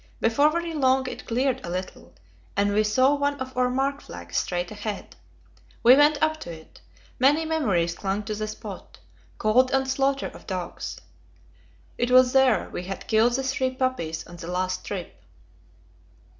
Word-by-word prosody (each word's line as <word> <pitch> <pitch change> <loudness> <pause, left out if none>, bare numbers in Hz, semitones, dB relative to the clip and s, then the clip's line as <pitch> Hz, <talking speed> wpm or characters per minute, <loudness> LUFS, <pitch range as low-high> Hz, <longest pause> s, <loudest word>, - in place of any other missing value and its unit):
Before 285 +7 +4
very 340 +1 -2
long 265 -3 +2
it - - -7
cleared 260 +2 0
a - - -6
little, 175 - -6 0.4
and 205 0 +2
we 215 +1 +3
saw 255 +6 +3
one 285 0 0
of 260 0 -6
our 250 0 +2
mark 270 +2 -1
flags 85 0 -10
straight 175 +1 -1
ahead. 210 -1 -6 0.7
We 245 +2 +9
went 290 +1 +4
up 315 0 +1
to 170 - -7
it; 160 - -13 0.4
many 290 +5 +4
memories 205 - +1
clung 195 +3 -2
to 215 +1 -4
the 215 0 -3
spot 215 - -9 0.4
cold 245 +4 +3
and 265 0 +1
slaughter 275 +1 0
of - - -14
dogs. 185 -3 -5 1.0
It 240 - +1
was 255 0 +6
there 265 -4 +4
we 180 - -5
had 195 +1 -6
killed 225 +2 +3
the 270 +2 0
three 260 -1 -1
puppies 210 -12 -2
on 175 - -12
the 165 - -8
last 185 +1 -2
trip. 180 - -6
250 Hz, 170 wpm, -25 LUFS, 195-270 Hz, 1.0 s, We